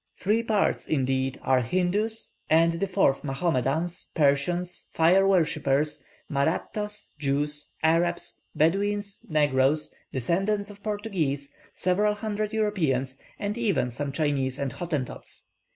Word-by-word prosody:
Three 215 +4 +2
parts, 220 -3 +1
indeed, 130 -2 0
are 130 -1 +3
Hindoos, 185 - 0 0.2
and 165 +1 +5
the 195 - 0
fourth 180 -8 +2
Mahomedans, 150 +3 -1
Persians, 165 +4 +1
Fire 185 +4 +5
worshippers, 155 -5 +2 0.2
Mahrattas, 210 +8 -2
Jews, 150 +1 -1
Arabs, 170 +2 +1
Bedouins, 200 +5 +1
Negroes, 145 -1 +2 0.2
descendants 195 - 0
of 200 0 -15
Portuguese, 190 -11 -2 0.2
several 210 +3 +2
hundred 215 0 -2
Europeans, 155 - 0 0.2
and 205 +1 -2
even 180 - +1
some 140 +4 -3
Chinese 140 -3 0
and 140 -2 -2
Hottentots. 155 -8 -5
165 Hz, 110 wpm, -27 LUFS, 140-200 Hz, 0.2 s, and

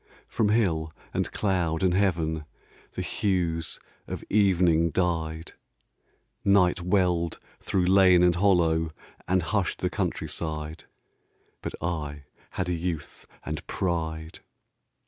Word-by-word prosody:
From 105 - +1
hill 85 -8 +1 0.2
and - - -1
cloud 90 -5 0
and 90 -1 +3
heaven 80 -5 +1 0.5
The - - -3
hues 85 -5 -1 0.3
of - - -5
evening 90 -5 +4
died; 80 -2 -1 0.9
Night 95 -3 +4
welled 90 -2 +1 0.2
through 95 -2 0
lane 95 -1 +6
and 90 -1 +5
hollow 85 -4 +3 0.4
And 95 -1 +2
hushed 95 0 0
the - - -1
countryside, 80 0 -3 0.8
But - - -5
I 75 -4 -3 0.3
had 90 - -3
youth 85 -2 -4 0.2
and 75 -1 -4
pride. 80 -3 -2
85 Hz, 105 wpm, -27 LUFS, 80-95 Hz, 0.9 s, lane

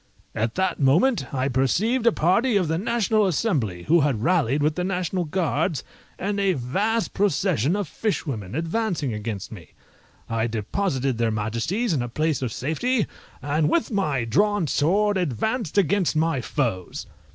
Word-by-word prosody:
At 115 +1 -2
that 190 0 0
moment 150 - +3
I 130 -1 0
perceived 195 - +1
a - - +7
party 205 +7 +2
of 180 -4 +1
the 160 +1 0
National 215 -1 +1
Assembly, 140 - -1
who 170 +3 +4
had 135 -7 0
rallied 150 -5 +2
with 150 +1 +2
the 180 - -2
National 180 -1 -1
Guards, 160 -3 -1 0.3
and 200 +1 -2
a 195 -2 +2
vast 200 - -1
procession 180 - +1
of 205 -4 -2
fishwomen, 135 - -3
advancing 165 - -1
against 105 -2 -5
me. 85 -8 -11 0.5
I 115 0 0
deposited 130 - -1
their 115 -1 +2
Majesties 115 - -1
in 140 - 0
a 120 - -3
place 155 +3 0
of 125 -3 -2
safety, 205 - 0 0.4
and 150 +2 +1
with 335 -6 +1
my 150 - 0
drawn 205 - +2
sword 200 +8 +2
advanced 185 - -2
against 195 -2 +2
my 155 -4 +1
foes. 115 - -2
160 Hz, 155 wpm, -24 LUFS, 130-200 Hz, 0.5 s, a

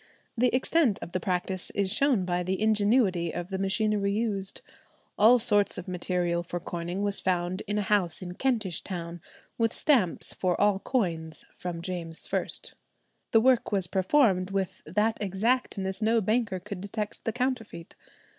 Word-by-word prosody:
The 250 +1 +3
extent 255 -2 +2
of - - -8
the 185 - -1
practice 180 +1 -2
is 195 -1 +1
shown 250 -6 +3
by 180 0 0
the 185 +1 -2
ingenuity 205 -5 +2
of 175 +1 -5
the 190 - -2
machinery 200 +1 +1
used. 200 -3 -2 0.5
"All 225 +4 +6
sorts 210 -4 +4
of - - -7
material 175 -1 -1
for 175 0 -5
coining 175 +3 -4
was 200 -1 +1
found 180 +1 -1
in 205 +1 -1
a 210 - 0
house 190 -5 +1
in 180 -2 -7
Kentish 220 -7 -1
town, 170 -2 -6 0.4
with 225 -1 +2
stamps 240 - +2
for 180 -2 -1
all 205 -1 +3
coins 170 -10 -2
from 175 -2 -5
James 170 -3 -4
I." - - +1 0.8
The 225 - +4
work 255 -1 +3
was 195 -3 +2
performed 190 0 +2
"with 195 -2 -3
that 210 +7 0
exactness 200 -1 -1
no 225 +2 +3
banker 215 -2 0
could 195 0 -7
detect 205 +1 -5
the 225 - -1
counterfeit." 245 -8 -3
195 Hz, 160 wpm, -28 LUFS, 180-220 Hz, 0.8 s, All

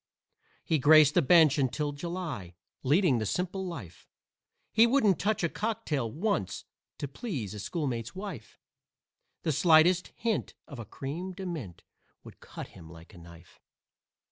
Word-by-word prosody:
He 160 - +1
graced 150 +1 +7
the 175 - +4
bench 155 -1 +5
until 145 +3 0
July, 145 - -6 0.3
leading 145 - +3
the 110 - -2
simple 185 - -2
life 105 - -9 0.7
He 225 +2 +6
wouldn't 220 - +3
touch 210 -3 0
a - - +3
cocktail 155 - -2
once 160 - -2 0.3
to 145 - -4
please 135 - -5
a 105 - -7
schoolmate's 120 - -3
wife; 185 - -8 0.9
The 160 - +1
slightest 170 +4 +4
hint 230 -2 -2
of 140 -5 -9
a 115 - -6
"creme 160 - -6
de 190 +1 -7
mint" 135 - -6 0.4
would - - -14
cut - - -9
him 80 - -14
like 85 +4 -14
a 90 - -13
knife. 85 0 -16
155 Hz, 145 wpm, -29 LUFS, 115-180 Hz, 0.9 s, graced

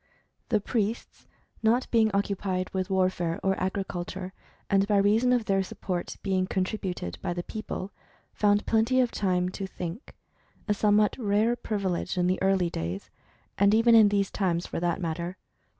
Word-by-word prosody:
The 220 -4 +3
priests, 220 +1 -3 0.3
not 230 +3 +3
being 225 -2 +4
occupied 195 -2 -1
with 185 -1 -2
warfare, 185 -3 0
or 195 0 +2
agriculture, 185 0 -3 0.3
and 195 0 +2
by 205 -1 +3
reason 215 +5 +3
of 245 -3 +2
their 195 -3 +2
support 185 -1 -4
being 185 -2 0
contributed 185 - -3
by 175 - -2
the 175 0 -4
people, 200 -2 -6 0.4
found 205 0 +2
plenty 230 +3 +2
of 250 -2 +2
time 180 -2 0
to 195 +1 -5
"think," 180 - -7 0.5
a 210 - +3
somewhat 210 0 +3
rare 215 +1 +2
privilege 195 -6 -2
in 180 - +2
the 185 +1 0
early 190 -3 +2
days 85 +4 -5 0.5
(and 200 +1 +5
even 230 +1 +5
in 220 -2 +8
these 200 -1 0
times, 175 -3 0
for - - -4
that 175 +1 0
matter). 170 +1 -3
195 Hz, 160 wpm, -27 LUFS, 185-215 Hz, 0.5 s, in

